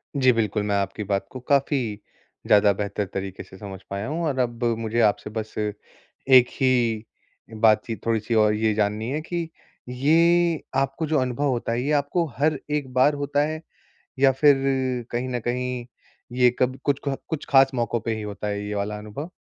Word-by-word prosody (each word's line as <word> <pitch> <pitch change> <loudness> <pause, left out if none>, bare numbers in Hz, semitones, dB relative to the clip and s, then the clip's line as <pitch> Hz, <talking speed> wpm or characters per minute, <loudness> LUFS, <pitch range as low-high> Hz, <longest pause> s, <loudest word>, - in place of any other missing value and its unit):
जी, 130 -2 +5
बिल्कुल, 110 -3 0
मैं 105 -1 0
आपकी 100 +1 -2
बात 100 -1 -1
को 130 - -7
काफ़ी 140 +2 +1 0.7
ज़्यादा 105 0 +5
बेहतर 100 +1 -3
तरीके 95 -1 -5
से 95 - -15
समझ 95 -2 -8
पाया 100 +2 -4
हूँ। 165 +4 -2
और 140 -4 -1
अब 120 -1 -1 0.2
मुझे 115 +1 -2
आपसे 105 -1 +1
बस 110 0 -5
एक 110 +4 +1
ही, 120 -4 +2 0.5
बातचीत 110 -1 +2
थोड़ी-सी 115 0 0
और 105 -1 +4
ये 110 0 +1
जाननी 105 +2 -1
है 150 +2 -2
कि 170 0 -4 0.4
ये 165 +5 +3 0.2
आपको 135 +4 -1
जो 155 -1 +2
अनुभव 130 +2 -1
होता 120 -2 -1
है, 120 +1 0
ये 145 - -1
आपको 150 +4 +1
हर 150 +1 +1
एक 145 -4 -2
बार 130 +4 +4
होता 145 0 +1
है? 155 0 -5 0.6
या 135 0 +6
फिर 145 +2 +5 0.6
कहीं 120 +2 -2
न 125 -1 -2
कहीं 125 +1 -3 0.5
ये 125 -1 +6
कब 130 +1 +1
कुछ 145 -1 +1
ख 140 - 0
कुछ 160 -3 -3
ख़ास 135 -1 +5
मौकों 120 -1 0
पे 115 0 -2
ही 110 - -5
होता 105 0 -5
है, 100 0 -3
ये 105 - -3
वाला 105 +1 -2
अनुभव? 105 +10 -7
120 Hz, 185 wpm, -24 LUFS, 105-140 Hz, 0.7 s, या